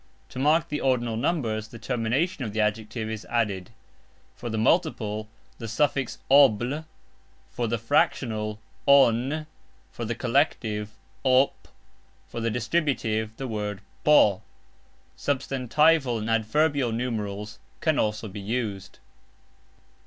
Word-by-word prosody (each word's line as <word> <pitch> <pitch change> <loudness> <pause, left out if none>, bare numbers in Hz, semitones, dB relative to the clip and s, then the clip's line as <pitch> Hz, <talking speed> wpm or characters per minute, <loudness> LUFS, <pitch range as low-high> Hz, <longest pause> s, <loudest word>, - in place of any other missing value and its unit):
To - - -7
mark 160 +4 +3
the 150 - -2
ordinal 120 -4 +1
numerals 110 -5 -1
the 115 - -11
termination 125 +7 -1
of 105 -4 -4
the 110 - -2
adjective 110 +1 -1
is 110 -1 -5
added; 105 -6 -1 0.7
for 120 - -6
the 110 - -2
multiple 110 - +1 0.3
the 115 - -5
suffix 135 +3 0
"obl", 135 +2 +4 0.7
for 120 - -2
the 115 +1 0
fractional 110 -4 0 0.3
"on", 140 +2 +4 0.5
for 120 - -6
the 115 +1 -2
collective 115 -5 0 0.3
"op", 130 +1 +3 0.6
for 115 - -6
the 115 - 0
distributive 115 -4 -1
the 135 - -4
word 105 -3 -4 0.2
"po". 105 -10 +5 0.7
Substantival 135 0 +2
and 110 +1 -3
adverbial 130 +4 +2
numerals 105 -3 -3 0.2
can 155 -3 +1
also 105 +1 -1
be 100 0 -7
used. 100 -4 -3
115 Hz, 120 wpm, -26 LUFS, 110-135 Hz, 0.7 s, po